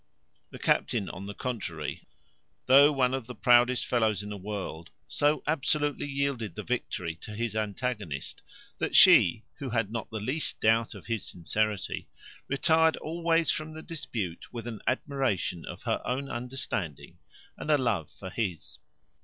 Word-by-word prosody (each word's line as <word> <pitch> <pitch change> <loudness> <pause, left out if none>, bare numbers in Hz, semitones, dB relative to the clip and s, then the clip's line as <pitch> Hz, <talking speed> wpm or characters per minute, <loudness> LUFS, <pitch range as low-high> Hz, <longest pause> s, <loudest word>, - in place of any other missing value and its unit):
The - - -9
captain, 110 -6 +1
on 95 +2 -7
the 100 - -6
contrary, 90 - -4 0.6
though 140 +3 +8
one 130 -3 +2
of 130 -4 -3
the 125 - -7
proudest 120 +2 +4
fellows 110 -5 +1
in 105 - -7
the 105 - -4
world, 95 -5 -5 0.2
so 145 +1 +1
absolutely 145 -1 0
yielded 135 -9 -2
the - - -5
victory 90 -8 -2
to 105 - -8
his 115 -1 -2
antagonist, 105 - -3 0.4
that - - -1
she, 100 +6 +7 0.2
who 140 - -4
had 115 -3 0
not 115 -1 -4
the 110 - -4
least 130 +9 -2
doubt 115 +1 +2
of - - -11
his 115 -3 -2
sincerity, 100 +3 -1 0.4
retired 160 +3 +3
always 165 +1 +1
from 155 0 -4
the 160 0 -8
dispute 110 - -5
with 120 -2 -6
an 115 -3 -6
admiration 130 - 0
of - - -8
her - - 0
own 135 +2 -2
understanding 120 - -4 0.4
and - - -7
a 150 - +6
love 115 - 0
for 95 -2 -9
his. 80 -9 -3
115 Hz, 155 wpm, -29 LUFS, 100-140 Hz, 0.6 s, though